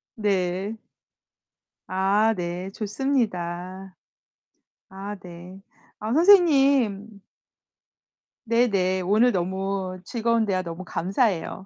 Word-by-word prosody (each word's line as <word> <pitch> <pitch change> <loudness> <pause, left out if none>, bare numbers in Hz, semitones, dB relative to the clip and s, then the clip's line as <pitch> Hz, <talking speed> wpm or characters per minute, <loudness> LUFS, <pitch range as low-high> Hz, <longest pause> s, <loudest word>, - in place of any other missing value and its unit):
네. 195 -1 -1 1.1
아, 200 +4 +2
네, 180 +1 -4
좋습니다. 195 -6 -3 1.0
아 195 +2 -7
네. 180 +1 -11 0.4
아 215 +2 -3
선생님 275 - +4 1.3
네네. 200 -6 +1
오늘 215 +7 +3
너무 190 0 -2
즐거운 230 +1 0
대화 185 -2 0
너무 170 +1 -7
감사해요. 190 +1 -1
195 Hz, 155 characters per minute, -24 LUFS, 185-225 Hz, 1.3 s, 선생님